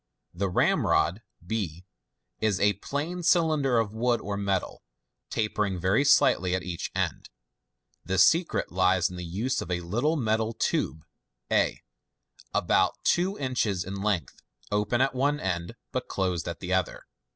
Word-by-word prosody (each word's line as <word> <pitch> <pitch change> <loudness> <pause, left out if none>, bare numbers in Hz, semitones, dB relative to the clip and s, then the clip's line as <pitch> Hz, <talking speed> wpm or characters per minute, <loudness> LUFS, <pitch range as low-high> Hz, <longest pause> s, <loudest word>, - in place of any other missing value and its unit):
The 95 +2 -1
ramrod, 90 +2 +2 0.2
b, 90 -4 -3 0.5
is 105 -3 +1
a 105 0 +4
plain 160 +6 -3
cylinder 155 -7 +3
of 110 -2 0
wood 120 +1 +1
or 100 0 -4
metal, 100 -2 -2 0.5
tapering 105 -4 -1
very 95 +9 +2
slightly 95 -9 +4
at 95 - -3
each 85 -1 -4
end. - - -2 0.7
The 95 0 -2
secret 165 - +3
lies 90 0 +2
in - - -8
the 90 - -6
use 100 +10 -2
of - - -7
a 90 -1 -1
little 120 - 0
metal 110 -4 0
tube 80 -7 -1 0.5
a, - - +1 0.7
about - - +2
two 185 +3 +2
inches 120 -9 -1
in 95 - -6
length, 100 -3 -2 0.3
open 105 +4 +1
at 135 +1 +2
one 145 +3 +1
end, 85 -2 -3 0.2
but - - -3
closed 90 -3 -1
at 85 - -5
the 90 0 -2
other. 95 -2 -1
100 Hz, 150 wpm, -27 LUFS, 90-125 Hz, 0.7 s, a